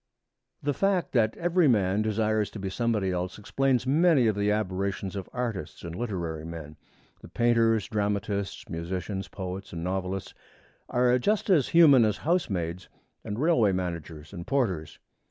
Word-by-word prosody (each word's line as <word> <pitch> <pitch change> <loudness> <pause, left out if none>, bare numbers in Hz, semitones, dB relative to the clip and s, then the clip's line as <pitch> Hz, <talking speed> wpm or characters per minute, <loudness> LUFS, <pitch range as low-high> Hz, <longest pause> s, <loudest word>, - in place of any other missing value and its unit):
The 145 0 +1
fact 195 +2 +1
that 110 -4 +2
every 175 -1 +2
man 100 -4 +2
desires 110 0 0
to 105 - -9
be 95 -1 -4
somebody 105 -3 0
else 90 0 -3
explains 130 +4 0
many 150 -1 +4
of 110 -2 +2
the 100 0 +1
aberrations 100 -1 -2
of 95 -2 -5
artists 115 -10 -4
and 85 0 -6
literary 85 -9 -3
men. 80 -2 -8 0.5
The - - -11
painters, 115 -2 +2
dramatists, 100 -1 -2
musicians, 90 +4 -4
poets, 95 0 -6
and 85 -1 -5
novelists 95 +1 -3 0.6
are 125 0 +3
just 205 - +1
as 150 -8 +4
human 150 -7 +7
as 105 -2 +1
housemaids 90 - -1 0.3
and 105 -1 -5
railway 125 - +3
managers 85 -3 -5
and 85 -3 -7
porters. 100 - -1
105 Hz, 150 wpm, -27 LUFS, 95-125 Hz, 0.6 s, human